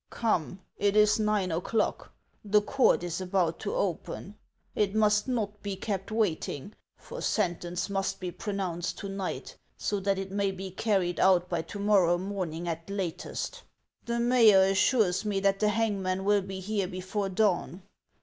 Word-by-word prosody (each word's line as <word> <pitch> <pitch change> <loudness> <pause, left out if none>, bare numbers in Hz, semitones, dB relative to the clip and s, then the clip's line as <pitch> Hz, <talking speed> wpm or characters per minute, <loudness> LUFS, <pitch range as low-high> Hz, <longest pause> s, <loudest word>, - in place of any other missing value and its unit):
" - - -53 0.2
Come, 185 -3 0 0.2
it 200 0 +1
is 210 +1 +5
nine 210 -4 +1
o'clock; 180 +7 -1 0.3
the 210 0 +3
court 265 -6 +3
is 175 +1 -3
about 180 -3 0
to 205 - -3
open; 190 +1 -3 0.4
it 205 -1 0
must 210 0 +3
not 210 -5 -2
be 200 -1 -3
kept 195 +1 -4
waiting, 205 -5 -1 0.2
for - - -9
sentence 175 -3 -1
must 195 -1 -2
be 180 -1 -4
pro 195 +4 -5
nounced 180 -3 -2
to 200 - -6
night, 195 -1 -5 0.2
so 205 - -1
that 195 0 0
it 195 0 -5
may 200 0 +1
be 190 0 -6
carried 190 -3 0
out 180 -2 +4
by 170 -2 0
to 165 - -9
morrow 200 -4 +3
morning 180 -3 -4
at 165 +1 -4
latest. 200 - -4 0.4
The 235 0 -2
mayor 235 -5 +6
assures 195 0 +3
me 205 -2 0
that 195 0 +2
the 210 - +3
hangman 195 -4 0
will 205 0 +4
be 190 0 -6
here 200 -1 -1
before 185 +2 -3
dawn. 185 -2 0
195 Hz, 170 wpm, -29 LUFS, 180-210 Hz, 0.4 s, mayor